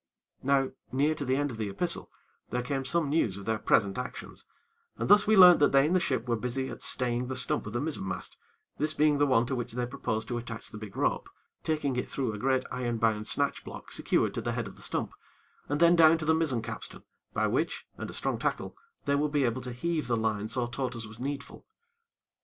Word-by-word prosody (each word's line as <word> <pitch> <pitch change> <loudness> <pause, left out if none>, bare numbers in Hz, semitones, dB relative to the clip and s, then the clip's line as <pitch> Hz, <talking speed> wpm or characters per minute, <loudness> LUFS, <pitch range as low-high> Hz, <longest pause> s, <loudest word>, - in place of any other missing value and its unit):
Now, 135 0 +2 0.2
near 145 +4 +2
to 150 - -5
the 130 -1 +1
end 145 0 0
of 115 - -7
the 110 -2 -2
epistle, 170 - -2 0.4
there 125 0 -1
came 135 +1 -2
some 160 +3 +1
news 140 - +1
of 100 - -9
their 110 -1 0
present 105 0 +2
actions, 125 - -7 0.5
and - - -2
thus 205 0 +6
we 220 -1 +5
learnt 180 -2 +10
that 145 - +4
they 135 0 +6
in 160 - +1
the 185 - +4
ship 130 -9 -1
were 120 - +2
busy 125 +3 -2
at - - -9
staying 125 -1 0
the 130 - -3
stump 125 - 0
of 105 - -6
the 120 - 0
mizzen 145 -8 -2
mast, 95 - -5 0.4
this 155 +1 0
being 150 -1 +3
the 145 - +4
one 125 -3 +4
to 130 - -2
which 120 -2 -4
they 125 0 -1
proposed 110 -2 -3
to 120 - -1
attach 115 -1 -8
the 105 - -8
big 105 -2 -9
rope, - - 0 0.3
taking 150 -4 0
it 125 - -2
through 130 -5 -2
a 105 - -6
great 130 +2 +2
iron 120 -2 -2
bound 110 -1 +1
snatch - - 0
block, - - -9
secured - - +1
to - - -3
the - - -2
head - - -2
of - - -11
the - - -16
stump, - - -2 0.6
and 145 +1 0
then 170 +1 +6
down 165 -1 +7
to 160 - -5
the 160 - +4
mizzen 150 -8 +1
capstan, 115 0 -7 0.3
by - - +2
which, - - -1
and - - -6
a - - -7
strong - - -1
tackle, - - -2 0.3
they 140 - +2
would 145 +1 +1
be 145 -2 +2
able 120 +2 -1
to 125 0 -5
heave 160 +5 -2
the 120 -2 +1
line 110 -2 -1
so 120 +2 -1
taut 125 +1 -3
as 115 -1 -5
was 110 +1 -12
needful. 140 +2 -5
130 Hz, 240 wpm, -29 LUFS, 115-145 Hz, 0.6 s, learnt